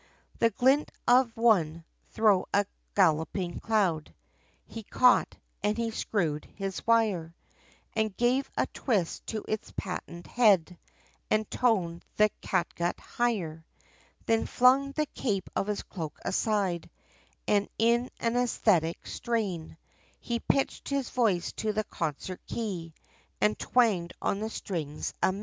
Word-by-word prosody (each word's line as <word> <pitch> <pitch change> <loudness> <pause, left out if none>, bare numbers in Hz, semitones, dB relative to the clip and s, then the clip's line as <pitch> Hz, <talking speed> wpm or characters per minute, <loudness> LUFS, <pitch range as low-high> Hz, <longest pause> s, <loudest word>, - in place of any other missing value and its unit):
The 230 - +5
glint 265 +6 +3 0.2
of 245 -2 +4
one, 170 -9 +3 0.2
thro' 210 -4 +3
a 200 0 +3 0.3
galloping 175 0 +1
cloud, 190 -8 0 0.5
He 225 - -8
caught, 250 +4 +3 0.3
and 210 +1 0
he 230 -1 -1
screwed 165 -9 -1
his 195 0 -5
wire, 205 -8 +2 0.6
And 220 -3 0
gave 250 +3 +2
a - - +3
twist, 200 - -1
to 215 -2 -4
its 215 - -3
patent 175 -2 -5
head, 195 -8 +3 0.5
And 215 0 +2
toned 185 -9 +1
the 215 0 +5
catgut 175 -1 -1
higher. 185 -10 -2 0.6
Then 225 0 +2
flung 265 +3 +4
the 305 +1 0
cape 205 -9 -3
of 195 - 0
his 210 -1 -2
cloak 160 -6 -6
aside, 190 -5 0 0.6
And 205 -1 +2
in 235 +2 +3
an 230 0 0
æsthetic 210 -9 +2
strain, 195 -10 -3 0.4
He 235 -1 -2
pitched 275 - 0
his 280 -3 -1
voice, 205 -8 +1
to 215 -1 -1
the 215 +1 0
concert 170 +1 -4
key, 175 -8 -4 0.4
And 210 - +3
twanged 210 -9 +2
on 200 - -1
the 220 +1 -3
strings 160 -9 -4
amain. 190 +1 +1
210 Hz, 130 wpm, -29 LUFS, 175-230 Hz, 0.6 s, The